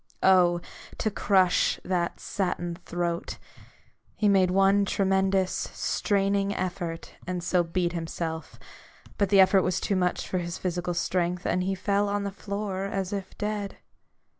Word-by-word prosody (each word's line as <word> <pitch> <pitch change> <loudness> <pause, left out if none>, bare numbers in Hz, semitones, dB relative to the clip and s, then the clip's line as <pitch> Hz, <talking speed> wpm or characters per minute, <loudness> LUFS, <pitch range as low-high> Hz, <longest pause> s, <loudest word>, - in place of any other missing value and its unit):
Oh, 175 -2 +5 0.4
to 215 - -1
crush 190 -3 +3
that 175 -2 -1
satin 175 -3 -2
throat! 170 -1 -3 0.8
He 210 - +1
made 190 -2 +4
one 195 +2 +4
tremendous, 190 -1 +1
straining 200 0 0
effort, 175 -2 -4
and 180 -1 -3
so 180 0 +2
beat 175 +1 -1
himself; 165 -1 -4 0.6
but 200 -2 +2
the 200 -1 +5
effort 190 0 +6
was 180 -1 0
too 200 - -1
much 180 -1 0
for 185 - -1
his 175 0 -4
physical 175 -1 -2
strength, 175 0 -1
and 180 - +1
he 195 +1 -1
fell 200 +2 +1
on 205 0 -1
the 200 - -3
floor 200 -1 -4
as 195 -1 -3
if 195 -2 -5
dead. 210 -1 -3
185 Hz, 145 wpm, -27 LUFS, 175-200 Hz, 0.8 s, effort